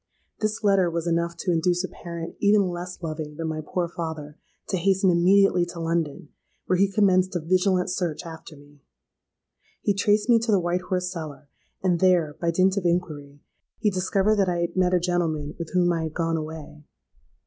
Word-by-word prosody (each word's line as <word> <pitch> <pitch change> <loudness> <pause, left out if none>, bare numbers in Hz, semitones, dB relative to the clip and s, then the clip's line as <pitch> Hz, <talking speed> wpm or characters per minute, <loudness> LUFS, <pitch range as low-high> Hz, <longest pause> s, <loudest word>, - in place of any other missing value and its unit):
This 215 +1 -2
letter 195 -3 +3
was 170 0 -3
enough 170 0 -1
to 180 - -1
induce 175 +2 +1
a - - -2
parent 170 -2 -7
even 205 -2 +3
less 175 +1 -7
loving 155 -2 -5
than 165 +1 -4
my 155 -1 -3
poor 175 +3 -2
father, 160 -3 -6 0.3
to 190 - 0
hasten 190 +1 +3
immediately 180 +1 +4
to 175 - -8
London, 165 -3 -2 0.4
where 185 0 +1
he 195 0 +3
commenced 185 -3 +3
a - - +1
vigilant 185 +2 +1
search 180 -2 -3
after 160 -1 -10
me. 145 0 -19 1.0
He 205 - +2
traced 205 +2 +2
me 235 -2 +5
to 225 0 -1
the 200 - +4
White 175 +1 -1
Horse 180 0 -2
Cellar; 155 -4 -8 0.3
and 180 -3 +2
there, 175 -5 +3
by 170 - +1
dint 185 +3 +2
of 200 - 0
inquiry, 150 -5 -2 0.4
he 215 -2 +1
discovered 195 +3 +1
that 195 -2 +2
I 175 -1 -1
had 170 - -2
met 185 -1 +2
a - - +3
gentleman 165 -4 -1
with 165 -2 -5
whom 175 -1 +3
I 165 -1 -1
had 155 - -6
gone 165 -1 0
away. 155 -1 -7
175 Hz, 190 wpm, -25 LUFS, 165-185 Hz, 1.0 s, me